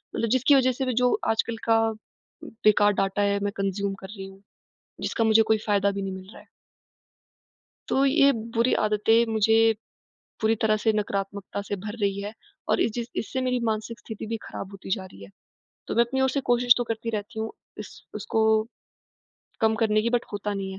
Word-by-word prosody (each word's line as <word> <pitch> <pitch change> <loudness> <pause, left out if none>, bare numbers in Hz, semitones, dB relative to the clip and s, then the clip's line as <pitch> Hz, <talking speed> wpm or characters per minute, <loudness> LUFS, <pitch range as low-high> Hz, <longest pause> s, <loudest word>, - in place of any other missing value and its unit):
मतलब 230 - -1
जिसकी 260 +4 +4
वजह 260 -1 +4
से 265 +2 -3
भी 255 - -1
जो 250 - +4 0.2
आजकल 225 +1 0
का 225 0 +5 0.6
बेकार 210 -2 +3
डाटा 195 +1 0
है, 200 0 +1
मैं 200 0 -1
कंज़्यूम 195 0 -1
कर 190 - -8
रही 195 - -6
हूँ, 195 0 -13 0.6
जिसका 230 - -1
मुझे 220 0 +5
कोई 220 - +5
फ़ायदा 200 -1 +2
भी 200 0 -4
नहीं 195 -1 -4
मिल 190 0 -9
रहा - - -13
है। - - -22 1.4
तो 270 - +2
ये 280 0 +5 0.2
बुरी 235 +2 +3
आदतें 215 +2 +3
मुझे, 225 +1 +4 0.7
पूरी 220 +1 +3
तरह 215 -1 +3
से 225 - +4
नकारात्मकता 200 -1 -3
से 205 0 -4
भर 210 +1 -5
रही 200 0 0
हैं 205 +2 -6 0.4
और - - +2
इस 225 - +2
जिस 235 0 -4
इससे 260 +4 -4
मेरी 250 -1 0
मानसिक 220 +1 -4
स्थिति 220 -2 -8
भी 225 +1 -2
ख़राब 195 - -7
होती 195 -1 -10
जा 190 -3 -8
रही 100 - -13
है। 100 - -12 0.6
तो - - -3
मैं 235 - +5
अपनी 265 +3 -2
ओर 265 0 +3
से 280 - -1
कोशिश 245 0 +5
तो 245 - 0
करती 230 0 -3
रहती 220 +1 -5
हूँ, 220 0 -2 0.3
इस - - -10
उसको 220 - -1 1.2
कम 220 -1 +3
करने 215 -1 +3
की, 235 - 0
बट 245 -1 +1
होता 205 0 -3
नहीं 195 -1 -4
है। 190 - -8
220 Hz, 200 wpm, -25 LUFS, 200-235 Hz, 1.4 s, का